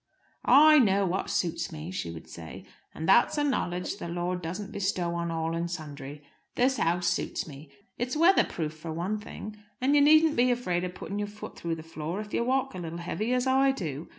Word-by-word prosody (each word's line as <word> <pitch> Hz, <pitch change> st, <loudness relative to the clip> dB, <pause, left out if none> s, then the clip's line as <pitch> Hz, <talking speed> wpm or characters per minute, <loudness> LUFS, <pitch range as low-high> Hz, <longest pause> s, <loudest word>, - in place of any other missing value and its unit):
"I 305 Hz, +1 st, +8 dB
know 200 Hz, -5 st, +3 dB
what 185 Hz, +1 st, -1 dB
suits 170 Hz, +1 st, -1 dB
me," 160 Hz, +2 st, -7 dB
she 185 Hz, -, -4 dB
would 80 Hz, -1 st, -9 dB
say. 80 Hz, -2 st, -10 dB, 0.3 s
"And 160 Hz, -, -5 dB
that's 235 Hz, +9 st, +5 dB
a 295 Hz, -, +2 dB
knowledge 180 Hz, -11 st, -1 dB
the -, -, -6 dB
Lord 175 Hz, +1 st, -2 dB
doesn't 185 Hz, +5 st, -5 dB
bestow 185 Hz, -4 st, -1 dB
on 170 Hz, 0 st, -2 dB
all 165 Hz, 0 st, -2 dB
and 170 Hz, +1 st, -2 dB
sundry. 145 Hz, -3 st, -7 dB, 0.3 s
This 260 Hz, +2 st, +2 dB
house 175 Hz, +1 st, +1 dB
suits 175 Hz, 0 st, -1 dB
me. 145 Hz, 0 st, -11 dB, 0.3 s
It's 250 Hz, +4 st, -1 dB
weather 345 Hz, +5 st, +6 dB
proof 155 Hz, -2 st, -4 dB
for 155 Hz, +1 st, -7 dB
one 180 Hz, +7 st, -2 dB
thing. 210 Hz, 0 st, -8 dB, 0.2 s
And 265 Hz, +3 st, +2 dB
you 290 Hz, -, +6 dB
needn't 310 Hz, +1 st, +5 dB
be 250 Hz, +1 st, +4 dB
afraid 185 Hz, -8 st, 0 dB
of 180 Hz, 0 st, -6 dB
putting 200 Hz, +1 st, -5 dB
your 205 Hz, -, -2 dB
foot 210 Hz, +1 st, -9 dB
through 165 Hz, -1 st, -3 dB
the 160 Hz, -, -9 dB
floor 165 Hz, +3 st, -5 dB
if 210 Hz, 0 st, -7 dB
you -, -, +1 dB
walk 265 Hz, +1 st, 0 dB
a 185 Hz, -, -6 dB
little 170 Hz, -1 st, -5 dB
heavy, 200 Hz, +7 st, -3 dB
as 250 Hz, 0 st, +1 dB
I 265 Hz, +1 st, +4 dB
do. 160 Hz, -, -5 dB
180 Hz, 215 wpm, -28 LUFS, 165-245 Hz, 0.3 s, I